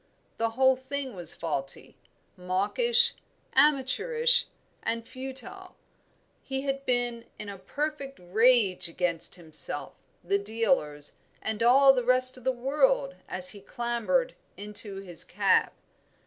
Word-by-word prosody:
The 230 0 +1
whole 265 0 +5
thing 265 0 -5
was 175 -4 0
faulty, 140 -4 -5 0.4
mawkish, 465 - +1 0.4
amateurish, 305 - +3 0.3
and 230 0 -2
futile. 270 +9 -5 0.7
He 265 0 -4
had 275 0 -4
been 245 -2 0
in 210 - -7
a 200 -1 -8
perfect 280 +5 -4
rage 200 0 +3
against 170 0 -2
himself, 155 -3 0 0.3
the 195 +3 +1
dealers, 200 - -1 0.2
and 220 0 -3
all 270 +3 +6
the 250 -2 -1
rest 255 +1 +3
of 255 - -13
the 260 - +2
world - - +1
as 275 - +3
he 205 -5 -6
clambered 240 - -1 0.2
into 205 0 -1
his 185 -4 -2
cab. - - +2
245 Hz, 120 wpm, -27 LUFS, 200-275 Hz, 0.7 s, all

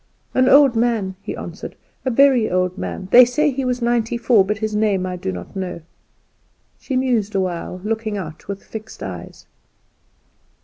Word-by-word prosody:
"An 255 0 +3
old 275 -3 +6
man," 225 -5 0
he - - -5
answered, - - -8 0.3
"a - - +2
very 255 -2 +4
old 180 0 0
man; 190 -1 -5
they 250 - +10
say 285 +5 +1
he 270 +1 -3
was 250 -1 -1
ninety 235 -1 0
four; 230 -3 +4
but 210 +2 -2
his 215 -1 -3
name 205 -3 +1
I 180 -1 -3
do 175 - -4
not 90 -1 -8
know." 185 -3 -4 1.0
She 265 - -4
mused 240 -6 0
a - - +3
while, 180 0 -3
looking 220 -1 -2
out 160 -5 -8
with 200 -1 -6
fixed 220 0 -9
eyes. - - -8
220 Hz, 175 wpm, -20 LUFS, 190-245 Hz, 1.0 s, they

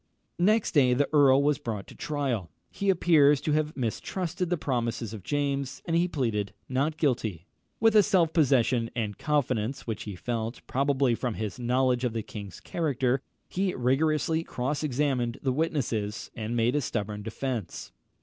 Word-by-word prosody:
Next 210 +5 +3
day 130 -5 +4
the 145 +2 +2
earl 140 -2 +6
was 145 -1 +2
brought 105 -4 -4
to - - -13
trial. 135 - -2 0.2
He 200 - -1
appears 155 -6 +5
to 155 - -1
have 150 0 0
mistrusted 170 - -2
the 175 - +1
promises 120 -5 -2
of 110 - -7
James, 140 +3 -2
and 165 - 0
he 170 +1 +3
pleaded 110 - -1
not 140 +5 0
guilty. 110 - -1 0.3
With 225 -1 +4
a 210 - +9
self 185 -6 +2
possession 125 -6 +3
and 105 -4 -3
confidence 135 -5 0
which 110 -3 -4
he 105 -3 -5
felt, 115 +3 -4
probably, 135 -1 +1
from 120 -1 -2
his 110 +1 -4
knowledge 125 +1 +1
of 120 -3 0
the 115 -2 -2
king's 100 -5 -8
character, 135 -5 0 0.3
he 190 0 -1
rigorously 155 +5 +1
cross 135 0 -2
examined 130 -4 0
the 130 -2 +1
witnesses, 120 -9 -2
and 115 0 -4
made 120 +2 +2
a 150 - +2
stubborn 105 -4 -3
defence. 115 -2 -4
130 Hz, 165 wpm, -28 LUFS, 115-150 Hz, 0.3 s, a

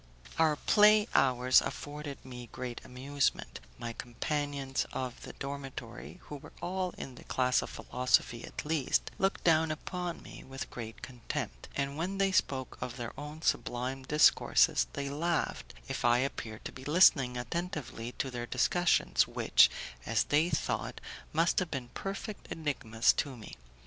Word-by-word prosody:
Our 160 -2 +4
play 210 +5 +5
hours 125 -1 +5
afforded 145 -1 -6
me 125 -2 -9
great 125 -2 -5
amusement; 135 +2 -1 0.2
my 115 - -5
companions 140 +3 -2
of 130 -2 -4
the - - -9
dormitory, 135 +1 -7
who 150 - -7
were - - -13
all 185 0 -2
in 130 - -7
the - - -13
class 125 -1 +2
of - - -6
philosophy 125 -1 +1
at - - -7
least, 150 -3 +1
looked 195 0 +1
down 160 -1 +4
upon 175 +3 -4
me - - -11
with 135 0 -7
great 115 -2 -8
contempt, 125 -3 -5
and 140 +1 -2
when 185 +4 -2
they 195 0 +2
spoke 135 -7 0
of 125 0 -4
their 120 -2 -5
own 150 +2 -8
sublime 125 +2 -1
discourses, 150 +4 +4
they 140 0 -3
laughed 165 - -1
if - - -4
I 120 0 +5
appeared 120 -4 -3
to - - -4
be 130 - -11
listening 140 -5 +5
attentively 125 -3 -4
to 135 - -3
their 120 -1 -4
discussions 175 +6 +3
which, - - +5 0.4
as 110 -2 +3
they 155 +4 +2
thought, - - -2 0.3
must 165 +2 +3
have 185 -3 -2
been 130 -5 -4
perfect 195 - -6
enigmas 120 -8 +1
to 140 -5 -2
me. 110 - -10
140 Hz, 155 wpm, -31 LUFS, 125-160 Hz, 0.4 s, play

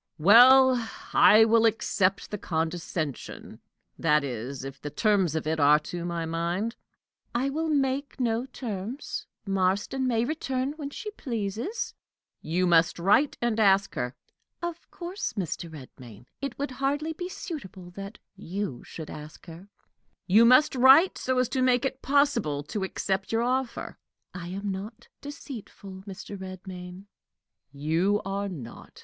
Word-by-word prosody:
"Well, 245 +6 +7 0.2
I 220 +1 +7
will 230 0 +5
accept 195 -3 0
the 210 - -4
condescension 160 -3 -4 0.4
that 150 -2 +3
is, 130 +1 -5
if 135 0 -8
the 145 - -5
terms 190 0 +1
of 160 - -2
it 160 +1 -1
are 145 +1 +6
to 170 +3 -6
my 170 -1 -3
mind." 170 +8 -2 0.6
"I 265 +3 +1
will 320 +3 -2
make 280 -1 0
no 235 0 0
terms. 235 0 -5 0.2
Marston 195 +7 0
may 230 -2 +1
return 265 -2 -2
when 295 -2 -6
she 425 +8 -7
pleases." 235 - -4 0.5
"You 175 +4 0
must 170 -1 +4
write 205 - +3
and 230 -2 +1
ask 195 -2 +4
her." 125 +1 -3 0.4
"Of 345 -1 -6
course, 360 +2 -5
Mr. 175 -3 -4
Redmain. 125 -6 -12 0.2
It 275 -3 -4
would 285 -1 -3
hardly 285 +5 -1
be 355 +3 -6
suitable 190 - -8
that 195 +3 -8 0.2
you 195 - -5
should 160 -2 -9
ask 150 0 -10
her." 170 +3 -11 0.6
"You 215 +5 +6
must 255 +5 +6
write 265 +8 +6
so 260 0 -1
as 255 -1 +3
to 260 - -1
make 255 0 +3
it 270 0 -3
possible 245 - +1
to 190 +7 -4
accept 190 0 -2
your 225 +1 +1
offer." 255 0 -2 0.3
"I 175 -2 -7
am 195 +3 -4
not 215 +5 -7
deceitful, 220 -9 -9
Mr. 195 +1 -8
Redmain." 185 0 -9 0.7
"You 165 +8 +1
are 200 +1 -2
not. 135 -11 -10
200 Hz, 145 wpm, -27 LUFS, 175-260 Hz, 0.7 s, Well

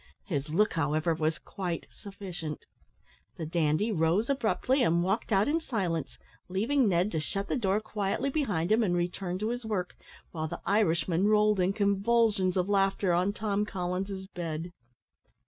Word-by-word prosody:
His 150 -6 -2
look, 205 +7 +2
however, 155 +1 +1
was 160 -1 0
quite 175 -4 -5
sufficient. 185 -6 -7 0.7
The 160 - -4
dandy 160 +6 +1
rose 180 - +2
abruptly, 260 +1 +1
and 170 -6 +3
walked 195 +6 -1
out 200 0 +3
in 320 +3 +1
silence, 180 - -2 0.3
leaving 225 +6 +2
Ned 180 +3 +2
to 160 - -1
shut 195 +6 -3
the - - 0
door 205 -5 +1
quietly 215 +5 -2
behind 205 - 0
him 220 +2 +5
and 185 -5 +1
return 175 +1 -2
to 215 +3 -2
his 245 +1 -3
work, 200 -5 -3 0.4
while 160 -2 -3
the - - -6
Irishman 180 -2 +2
rolled 210 -1 +4
in 180 +1 +3
convulsions 200 -1 +2
of 180 0 +1
laughter 195 -2 +2
on 180 +3 +2
Tom 210 -1 -1
Collins's 190 0 -3
bed. 170 -2 -5
195 Hz, 160 wpm, -29 LUFS, 170-210 Hz, 0.7 s, him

